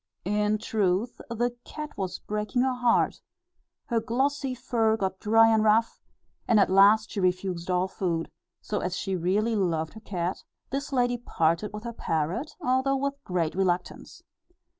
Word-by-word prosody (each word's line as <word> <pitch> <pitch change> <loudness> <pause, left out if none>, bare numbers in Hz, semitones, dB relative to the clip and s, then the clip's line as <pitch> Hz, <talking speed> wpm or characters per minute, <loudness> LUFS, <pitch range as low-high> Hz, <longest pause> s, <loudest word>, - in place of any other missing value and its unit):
In 210 +2 +1
truth, 210 0 -1
the 240 +1 -1
cat 300 -1 -7
was 185 -2 -3
breaking 210 +4 -1
her 260 -1 +1
heart; 245 -1 +1 0.6
her 235 -3 0
glossy 265 +4 -1
fur 225 -2 +1
got 190 -2 -2
dry 225 +1 +5
and 220 -1 +3
rough, 220 +1 +2 0.5
and 225 -3 +5
at 195 - +3
last 205 +3 +5
she - - -3
refused 185 -1 -1
all 180 +1 +2
food; 170 -4 -2 0.3
so, 210 - -2
as 180 0 -3
she 195 -2 -2
really 200 +6 +1
loved 165 -5 0
her 220 - -10
cat, 180 -3 -3 0.3
this 280 +2 -3
lady 245 -2 +1
parted 170 -2 0
with 210 +1 -7
her 235 -1 -5
parrot, 175 - -2
although 260 +2 +2
with 280 +1 -3
great 175 -6 -1
reluctance. 185 -1 -2
210 Hz, 160 wpm, -27 LUFS, 185-240 Hz, 0.6 s, dry